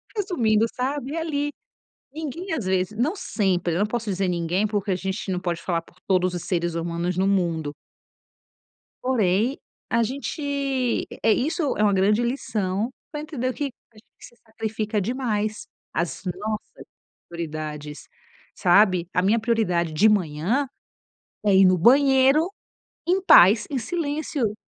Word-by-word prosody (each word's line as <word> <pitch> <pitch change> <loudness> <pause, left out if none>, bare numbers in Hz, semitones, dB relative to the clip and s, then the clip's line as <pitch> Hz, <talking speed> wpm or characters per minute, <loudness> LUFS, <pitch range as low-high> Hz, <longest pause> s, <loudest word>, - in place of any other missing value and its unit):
Resumindo, 240 - +2
sabe, 275 +2 -3
ali, 295 -3 -1 0.6
ninguém 320 +5 -5
às 245 - -3
vezes 190 +2 0
não 295 +9 +1
sempre, 190 - 0
eu - - 0
não 205 - +2
posso 220 -1 -3
dizer 190 +1 0
ninguém, 175 +3 0
porque 205 -1 -2
a 185 - +2
gente 195 +2 -4
não 180 - 0
pode 175 -2 -3
falar 170 -2 0
por - - -23
todos 185 -1 +2
os 175 - -4
seres 170 -2 -1
humanos 170 +1 -2
no 190 +1 +2
mundo. 165 -6 0 1.3
Porém, 230 0 +1 0.3
a 230 0 +2
gente 275 0 -2 0.2
é, 225 - +5
isso 310 +2 0
é 210 - +1
uma 205 - +4
grande 205 +4 +3
lição 220 -4 -1 0.2
para 295 -1 -4
entender 280 -5 -3
o - - -3
que 290 - -4 0.3
a 225 - -32
gente 215 - -18
se 240 - -14
sacrifica 220 -1 -3
demais, 215 -2 -2 0.3
as 170 0 -2
nossas 215 +2 -6 0.4
prioridades, 155 -3 -6 0.5
sabe. 185 -2 +4
A 180 - +2
minha 215 +4 +3
prioridade 215 -8 0
de 155 +8 +4
manhã 200 - +1 0.8
é 200 - +4
ir 190 0 +7
no 185 0 +5
banheiro 270 - +5 0.6
em 375 +2 +2
paz, 205 - +7
em 280 - -2
silêncio, 290 -4 -2
215 Hz, 150 wpm, -24 LUFS, 180-260 Hz, 1.3 s, ir